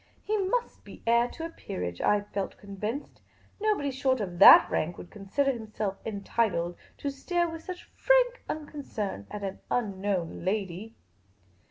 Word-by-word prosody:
He 430 Hz, -, 0 dB
must 425 Hz, +5 st, -1 dB
be -, -, -13 dB
heir 235 Hz, +1 st, +4 dB
to 325 Hz, +6 st, -7 dB
a -, -, -4 dB
peerage, 90 Hz, -, -5 dB
I 205 Hz, 0 st, +3 dB
felt 200 Hz, -1 st, -4 dB
convinced; 210 Hz, +7 st, -5 dB, 0.4 s
no 430 Hz, 0 st, +3 dB
body 285 Hz, -6 st, -2 dB
short 260 Hz, -1 st, +1 dB
of 180 Hz, -4 st, -4 dB
that -, -, +11 dB
rank 170 Hz, +3 st, -1 dB
would 175 Hz, -, -10 dB
consider 215 Hz, +8 st, 0 dB
himself 215 Hz, -4 st, -4 dB
entitled 200 Hz, -4 st, -1 dB, 0.2 s
to 285 Hz, -, -3 dB
stare 345 Hz, +5 st, 0 dB
with 325 Hz, -1 st, -7 dB
such 365 Hz, -1 st, -7 dB
frank -, -, +3 dB
unconcern 275 Hz, -, -4 dB
at 205 Hz, -, -6 dB
an 195 Hz, -1 st, -4 dB
unknown 195 Hz, -7 st, -1 dB
lady. 195 Hz, +2 st, -2 dB
220 Hz, 155 wpm, -28 LUFS, 195-295 Hz, 0.4 s, that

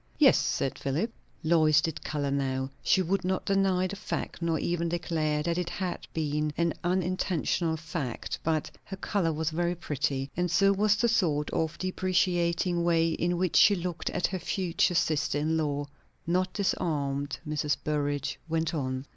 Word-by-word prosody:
"Yes," -, -, +6 dB
said 135 Hz, -, -1 dB
Philip. 160 Hz, -, -1 dB, 0.3 s
Lois 155 Hz, -2 st, +5 dB
did 160 Hz, 0 st, -3 dB
colour 145 Hz, -2 st, -2 dB
now; 135 Hz, -1 st, -1 dB
she 190 Hz, -, +3 dB
could 195 Hz, +3 st, 0 dB
not 185 Hz, +1 st, -1 dB
deny 195 Hz, -2 st, +2 dB
the 190 Hz, +2 st, -3 dB
fact, 200 Hz, -3 st, -4 dB
nor 165 Hz, -1 st, +1 dB
even 170 Hz, +2 st, -1 dB
declare 155 Hz, -3 st, -1 dB
that 170 Hz, +2 st, 0 dB
it 175 Hz, -1 st, -2 dB
had 185 Hz, -1 st, -4 dB
been 150 Hz, -1 st, -1 dB
an 170 Hz, -1 st, +1 dB
unintentional 180 Hz, -2 st, 0 dB
fact; 150 Hz, -6 st, -4 dB
but 155 Hz, -1 st, 0 dB
her 195 Hz, -, -7 dB
colour 190 Hz, -4 st, 0 dB
was 160 Hz, +1 st, -1 dB
very 175 Hz, +2 st, 0 dB
pretty, 140 Hz, -4 st, -2 dB
and 180 Hz, +1 st, 0 dB
so 195 Hz, +3 st, +4 dB
was 210 Hz, +1 st, +3 dB
the 235 Hz, +3 st, +2 dB
sort 165 Hz, -10 st, +1 dB
of 160 Hz, 0 st, -1 dB
deprecating 180 Hz, -2 st, +1 dB
way 165 Hz, -1 st, +3 dB
in 175 Hz, +2 st, 0 dB
which 180 Hz, -1 st, +1 dB
she 205 Hz, -, +7 dB
looked 175 Hz, -2 st, -3 dB
at 180 Hz, -, 0 dB
her 185 Hz, +1 st, -1 dB
future 180 Hz, -1 st, 0 dB
sister 155 Hz, -3 st, +1 dB
in 155 Hz, +2 st, 0 dB
law. 145 Hz, -2 st, -1 dB, 0.4 s
Not 185 Hz, +2 st, +1 dB
disarmed, 145 Hz, -8 st, -1 dB
Mrs. 150 Hz, -1 st, 0 dB
Burrage 145 Hz, -2 st, -1 dB
went 165 Hz, 0 st, 0 dB
on. 130 Hz, -3 st, -2 dB
165 Hz, 165 wpm, -28 LUFS, 150-180 Hz, 0.4 s, she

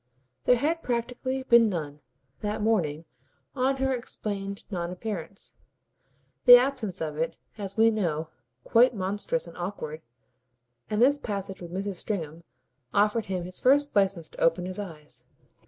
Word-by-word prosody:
There 250 Hz, -, +6 dB
had 310 Hz, +7 st, 0 dB
practically 250 Hz, +1 st, -2 dB
been 235 Hz, -3 st, +6 dB
none, 150 Hz, -6 st, -4 dB, 0.4 s
that 210 Hz, 0 st, -2 dB
morning, 165 Hz, -8 st, +1 dB, 0.5 s
on 265 Hz, +1 st, +2 dB
her 265 Hz, 0 st, +1 dB
explained 200 Hz, -5 st, -4 dB
non 175 Hz, -3 st, -2 dB
appearance 195 Hz, 0 st, -6 dB, 0.9 s
the 245 Hz, -1 st, +12 dB
absence 245 Hz, -8 st, +1 dB
of 155 Hz, -2 st, -3 dB
it, 165 Hz, +1 st, -1 dB, 0.2 s
as 200 Hz, -1 st, -6 dB
we 225 Hz, +1 st, +6 dB
know, 165 Hz, -7 st, -1 dB, 0.3 s
quite 240 Hz, +1 st, +4 dB
monstrous 205 Hz, -, -2 dB
and -, -, -12 dB
awkward; 175 Hz, -4 st, -5 dB, 0.9 s
and 215 Hz, +2 st, +2 dB
this 285 Hz, +3 st, +4 dB
passage 200 Hz, -6 st, -4 dB
with 170 Hz, -1 st, -8 dB
Mrs. 195 Hz, +1 st, -3 dB
Stringham 165 Hz, -6 st, -4 dB, 0.5 s
offered 210 Hz, +2 st, +2 dB
him 185 Hz, -2 st, -3 dB
his 180 Hz, +1 st, -5 dB
first 285 Hz, +1 st, +3 dB
licence 190 Hz, -5 st, +2 dB
to -, -, -11 dB
open 165 Hz, +2 st, +3 dB
his 185 Hz, +2 st, -5 dB
eyes. 160 Hz, -7 st, -8 dB
205 Hz, 145 wpm, -27 LUFS, 175-240 Hz, 0.9 s, the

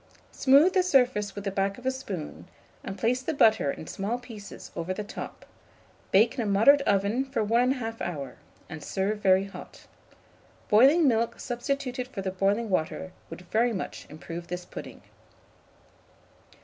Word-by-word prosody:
Smooth 280 Hz, +7 st, +5 dB
the 375 Hz, -, +4 dB
surface 250 Hz, -, +2 dB
with 200 Hz, -, -6 dB
the 200 Hz, -, -2 dB
back 195 Hz, +1 st, -1 dB
of 250 Hz, -, -13 dB
a 260 Hz, -, +2 dB
spoon, 135 Hz, -, -7 dB, 0.4 s
and 195 Hz, -, -6 dB
place 240 Hz, +6 st, +1 dB
the 305 Hz, +4 st, -3 dB
butter 220 Hz, -, +4 dB
in 160 Hz, -, -5 dB
small 205 Hz, +8 st, -3 dB
pieces 230 Hz, -5 st, -11 dB
over 175 Hz, +2 st, -3 dB
the 210 Hz, -, -4 dB
top; 205 Hz, -, -8 dB, 0.6 s
bake 220 Hz, +4 st, +4 dB
in 255 Hz, -, -3 dB
a -, -, -2 dB
moderate 225 Hz, +9 st, +5 dB
oven 200 Hz, +6 st, +2 dB
for 265 Hz, -4 st, -2 dB
1 240 Hz, +5 st, +2 dB
1/2 225 Hz, -3 st, -5 dB
hour, 140 Hz, -7 st, -5 dB, 0.3 s
and 160 Hz, -2 st, -8 dB
serve 200 Hz, +5 st, -1 dB
very 190 Hz, -1 st, +4 dB
hot. 195 Hz, +1 st, -11 dB, 0.8 s
Boiling 275 Hz, +9 st, +6 dB
milk 230 Hz, -2 st, +1 dB
substituted 250 Hz, 0 st, -3 dB
for 225 Hz, -7 st, -6 dB
the 190 Hz, -, -2 dB
boiling 200 Hz, +4 st, 0 dB
water 185 Hz, +1 st, -1 dB, 0.2 s
would -, -, -8 dB
very 235 Hz, +2 st, +2 dB
much 190 Hz, -, -6 dB
improve 165 Hz, +3 st, -8 dB
this 180 Hz, 0 st, -5 dB
pudding. -, -, -10 dB
215 Hz, 160 wpm, -27 LUFS, 190-250 Hz, 0.8 s, Boiling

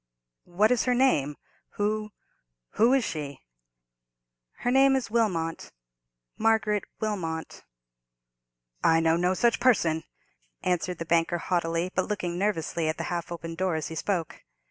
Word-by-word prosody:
"What 205 Hz, +6 st, +3 dB
is 250 Hz, -, +2 dB
her 250 Hz, -1 st, +2 dB
name?—who—who 215 Hz, -, -1 dB, 0.8 s
is 270 Hz, -2 st, +3 dB
she?" 145 Hz, -7 st, -5 dB, 1.2 s
"Her 245 Hz, -, +1 dB
name 270 Hz, +1 st, +5 dB
is 260 Hz, -5 st, -2 dB
Wilmot—Margaret 165 Hz, -, -1 dB
Wilmot." 170 Hz, -7 st, -4 dB, 1.2 s
"I 165 Hz, 0 st, +5 dB
know 165 Hz, 0 st, +3 dB
no 180 Hz, +2 st, +1 dB
such 235 Hz, +3 st, +2 dB
person!" 165 Hz, -11 st, +3 dB, 0.6 s
answered 180 Hz, 0 st, 0 dB
the 165 Hz, -, -5 dB
banker, 170 Hz, +1 st, +2 dB
haughtily, 170 Hz, 0 st, -1 dB
but 185 Hz, -, 0 dB
looking 180 Hz, -4 st, -3 dB
nervously 170 Hz, -5 st, -1 dB
at 155 Hz, -, -2 dB
the -, -, -3 dB
half 175 Hz, 0 st, -4 dB
opened 165 Hz, -1 st, -6 dB
door 185 Hz, -2 st, 0 dB
as 155 Hz, -1 st, -3 dB
he 160 Hz, -, -6 dB
spoke. 170 Hz, -2 st, -3 dB
175 Hz, 125 wpm, -27 LUFS, 160-215 Hz, 1.2 s, name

